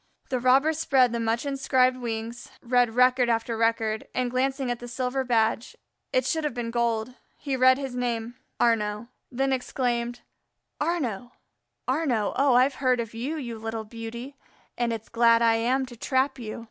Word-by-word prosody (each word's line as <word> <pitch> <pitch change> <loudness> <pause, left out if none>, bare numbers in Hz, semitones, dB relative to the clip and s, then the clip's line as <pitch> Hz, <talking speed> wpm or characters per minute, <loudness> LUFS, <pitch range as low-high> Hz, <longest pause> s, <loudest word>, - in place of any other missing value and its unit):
The 255 - 0
robber 265 +5 +4
spread 270 -6 +3
the 235 - -2
much 230 +3 -1
inscribed 260 -2 +2
wings, 230 -1 -5
read 245 -2 +2
record 250 0 +4
after 230 0 0
record, 225 -1 0
and 250 -1 0
glancing 265 0 0
at 240 - -3
the 245 - -8
silver 255 +2 -2
badge 230 -1 0 0.4
it 255 -1 +1
should 320 +3 0
have 295 -5 -2
been 235 -1 -3
gold 235 0 0 0.2
he 275 -2 -3
read 260 0 +5
his 270 -2 -5
name 240 -2 -2 0.3
Arnaux; 220 -1 +1 0.2
then 270 +2 0
exclaimed: 245 -2 -2 0.6
"Arnaux! 255 - -2 0.5
Arnaux! 255 -6 0
Oh, 270 -2 +3
I've 260 +2 +3
heard 255 -2 +3
of 230 -1 -4
you, 260 +8 -3
you 235 -6 -6
little 225 0 -4
beauty, 235 +5 -8 0.4
and 240 -1 0
it's 225 -1 -5
glad 230 0 +4
I 225 -1 +4
am 255 +4 +1
to 250 -1 -11
trap 265 +3 0
you." 220 -2 -6
245 Hz, 170 wpm, -26 LUFS, 230-260 Hz, 0.6 s, read